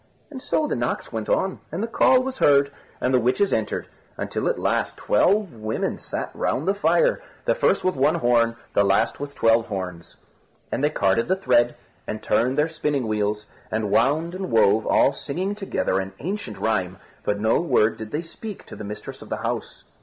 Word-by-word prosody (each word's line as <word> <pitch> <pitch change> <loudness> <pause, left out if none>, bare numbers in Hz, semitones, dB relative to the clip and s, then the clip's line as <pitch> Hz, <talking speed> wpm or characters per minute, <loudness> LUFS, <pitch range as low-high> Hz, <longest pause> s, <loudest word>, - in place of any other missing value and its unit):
And 265 -3 -7
so 310 - 0
the - - -1
knocks 120 0 -3
went 110 -2 -3
on, 190 0 +1
and 175 +7 -3
the - - -1
call 255 +2 +4
was 265 0 -5
heard, 140 -1 +4 0.3
and 125 - 0
the 130 - +5
witches 130 - +2
entered, 110 -1 -1 0.3
until - - -2
at - - +1
last - - 0
twelve 195 - +2
women 110 -1 -3
sat - - -4
round 150 +7 -1
the 195 - +4
fire - - +2 0.2
the - - +3
first - - +2
with 185 0 +1
one 145 +5 +3
horn, 120 -6 +2 0.2
the 100 - +4
last 100 +4 +2
with 145 0 -6
twelve 115 0 +3
horns. 90 -4 -6 0.5
And - - -1
they 150 - +4
carded 100 -5 +1
the 185 - +2
thread, 120 -9 +2 0.3
and 110 - -5
turned 130 +4 +1
their 150 +1 +3
spinning 150 -6 -1
wheels, 105 0 -1 0.2
and 110 -2 -2
wound 150 +8 +2
and 190 +1 -4
wove, 110 -2 +3
all - - +4
singing 185 +7 -3
together 195 - -1
an 95 0 -5
ancient 195 - -5
rhyme, 95 -5 -1 0.3
but 100 0 -1
no 110 +6 +2
word 125 -9 +2
did 110 -1 -7
they 150 +8 -3
speak 205 +5 -9
to - - -10
the - - -8
mistress 105 +1 -7
of - - -11
the - - -2
house. - - -4
125 Hz, 200 wpm, -24 LUFS, 110-180 Hz, 0.5 s, the